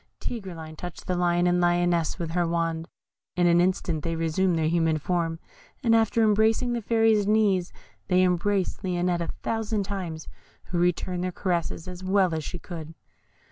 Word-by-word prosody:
Tigreline 170 Hz, -9 st, -6 dB
touched 175 Hz, 0 st, -8 dB
the 180 Hz, -, -1 dB
Lion 175 Hz, 0 st, +2 dB
and 180 Hz, 0 st, +3 dB
Lioness 175 Hz, -2 st, +2 dB
with 170 Hz, -3 st, -4 dB
her 175 Hz, 0 st, +1 dB
wand; 165 Hz, -1 st, -1 dB, 0.5 s
in 175 Hz, -, +2 dB
an 175 Hz, 0 st, +5 dB
instant 175 Hz, -4 st, 0 dB
they 165 Hz, 0 st, -1 dB
resumed 165 Hz, +2 st, +1 dB
their 160 Hz, -1 st, +1 dB
human 165 Hz, -1 st, +2 dB
form, 165 Hz, +1 st, -1 dB, 0.5 s
and 230 Hz, -2 st, +4 dB
after 225 Hz, +1 st, +3 dB
embracing 220 Hz, +3 st, +3 dB
the 235 Hz, -, -2 dB
Fairy's 225 Hz, -2 st, +3 dB
knees, 205 Hz, -4 st, +2 dB, 0.4 s
they 185 Hz, 0 st, +4 dB
embraced 185 Hz, +2 st, 0 dB
Lionette 180 Hz, -1 st, 0 dB
a 170 Hz, -, -2 dB, 0.2 s
thousand 220 Hz, -2 st, -1 dB
times, 185 Hz, -5 st, -5 dB, 0.4 s
who 175 Hz, -, -1 dB
returned 180 Hz, +1 st, 0 dB
their 185 Hz, -, -1 dB
caresses 175 Hz, -1 st, -2 dB
as 180 Hz, 0 st, -8 dB
well 190 Hz, -2 st, +2 dB
as 160 Hz, -1 st, -2 dB
she 175 Hz, -, -5 dB
could. 165 Hz, -3 st, -8 dB
180 Hz, 170 wpm, -26 LUFS, 170-195 Hz, 0.5 s, an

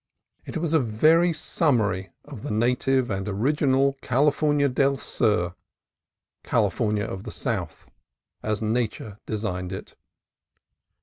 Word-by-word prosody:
It -, -, -4 dB
was 165 Hz, -1 st, -1 dB
a 160 Hz, -, +5 dB
very 155 Hz, +9 st, +4 dB
sum 155 Hz, -3 st, +1 dB
mary 95 Hz, -3 st, -1 dB, 0.2 s
of 105 Hz, -, -9 dB
the -, -, -5 dB
native 125 Hz, +3 st, +1 dB
and 95 Hz, 0 st, -2 dB
original 135 Hz, +5 st, +2 dB
California 145 Hz, +2 st, +2 dB
del 135 Hz, +1 st, +2 dB
Sur, 90 Hz, -7 st, 0 dB, 0.9 s
California 105 Hz, 0 st, +1 dB
of 95 Hz, -4 st, -5 dB
the -, -, -7 dB
South, -, -, -4 dB, 0.5 s
as 110 Hz, 0 st, -2 dB
Nature 110 Hz, -2 st, -2 dB
designed 90 Hz, -4 st, -3 dB
it. 95 Hz, -, -7 dB
120 Hz, 120 wpm, -25 LUFS, 105-140 Hz, 0.9 s, a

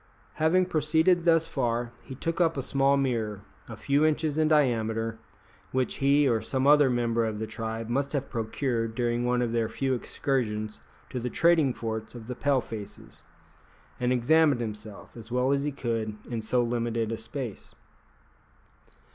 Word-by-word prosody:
Having 180 Hz, +4 st, +4 dB
proceeded 160 Hz, +2 st, +2 dB
thus 165 Hz, -1 st, +4 dB
far, 120 Hz, -6 st, -1 dB
he 130 Hz, -, -9 dB
took 165 Hz, +6 st, -2 dB
up 165 Hz, -3 st, +2 dB
a 135 Hz, -, -2 dB
small 140 Hz, +1 st, +2 dB
mirror, 115 Hz, -7 st, -1 dB, 0.3 s
a 110 Hz, -, -7 dB
few 140 Hz, +6 st, +1 dB
inches 155 Hz, -1 st, +1 dB
in 155 Hz, 0 st, +2 dB
diameter, 115 Hz, -6 st, +1 dB, 0.5 s
which 130 Hz, -1 st, -1 dB
he 140 Hz, +1 st, +4 dB
or 115 Hz, -3 st, +2 dB
some 130 Hz, 0 st, -1 dB
other 145 Hz, -1 st, +6 dB
member 120 Hz, -1 st, +1 dB
of 110 Hz, -1 st, -2 dB
the 110 Hz, -, -3 dB
tribe 110 Hz, 0 st, -5 dB
must 140 Hz, +4 st, -1 dB
have 140 Hz, -2 st, -1 dB
procured 115 Hz, 0 st, -2 dB
during 120 Hz, 0 st, 0 dB
one 125 Hz, 0 st, +1 dB
of 120 Hz, -, -1 dB
their 115 Hz, -1 st, 0 dB
few 130 Hz, +4 st, -1 dB
excursions 110 Hz, -4 st, -2 dB, 0.3 s
to 125 Hz, -, -3 dB
the 125 Hz, +1 st, -3 dB
trading 165 Hz, -2 st, +3 dB
forts 110 Hz, -1 st, -5 dB
of 115 Hz, -2 st, -9 dB
the 125 Hz, -, -4 dB
Pale 135 Hz, +1 st, +1 dB
faces, 105 Hz, -3 st, -9 dB, 0.8 s
and 125 Hz, 0 st, +1 dB
examined 140 Hz, +3 st, +4 dB
himself, 105 Hz, -2 st, -7 dB
as 115 Hz, -1 st, -11 dB
well 125 Hz, +2 st, +2 dB
as 140 Hz, 0 st, +1 dB
he 150 Hz, -, -1 dB
could, 115 Hz, -5 st, -3 dB
in 115 Hz, -2 st, -2 dB
so 120 Hz, +3 st, +1 dB
limited 115 Hz, -1 st, -1 dB
a -, -, -1 dB
space. 115 Hz, 0 st, -6 dB
125 Hz, 170 wpm, -27 LUFS, 115-140 Hz, 0.8 s, other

